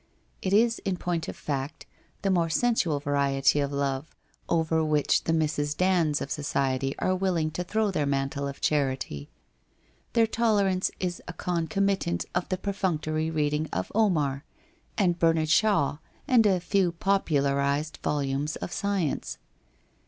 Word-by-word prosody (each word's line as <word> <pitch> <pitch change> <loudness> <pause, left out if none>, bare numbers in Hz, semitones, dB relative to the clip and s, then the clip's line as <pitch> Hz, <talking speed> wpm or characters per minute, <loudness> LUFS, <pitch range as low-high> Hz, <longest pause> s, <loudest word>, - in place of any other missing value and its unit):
It 190 - -2
is, 230 +3 +3
in 190 -2 -2
point 170 -2 -2
of - - -5
fact, 145 +1 -4 0.4
the 195 - +2
more 170 -3 +2
sensual 175 -6 +1
variety 140 0 +2
of 140 -1 -1
love 140 +1 -2 0.3
over 160 -1 +2
which 150 -2 +2
the - - +1
Mrs. 150 -2 0
Dands 175 -5 +2
of 140 - -5
so - - -2
ciety 135 -1 0
are 185 - +1
willing 180 -4 0
to 180 - -3
throw 215 +3 0
their 150 -6 0
mantle 140 0 -1
of 140 - -8
charity. 130 - -1 0.8
Their 230 -1 +5
tolerance 205 -5 +1
is 180 -1 -3
a 180 - -5
concomitant 180 +2 -1
of 180 0 -1
the 185 - 0
perfunctory 160 -6 -1
reading 150 -1 0
of 95 - -3
Omar, 150 -11 +1 0.5
and 180 -4 +2
Bernard 165 -2 +2
Shaw 160 -6 +3 0.3
and 240 -6 +5
a 190 -3 +3
few 180 0 +1
popularized 145 -5 0
volumes 145 +1 -1
of - - -6
science. 195 -8 -2
160 Hz, 145 wpm, -27 LUFS, 145-190 Hz, 0.8 s, Their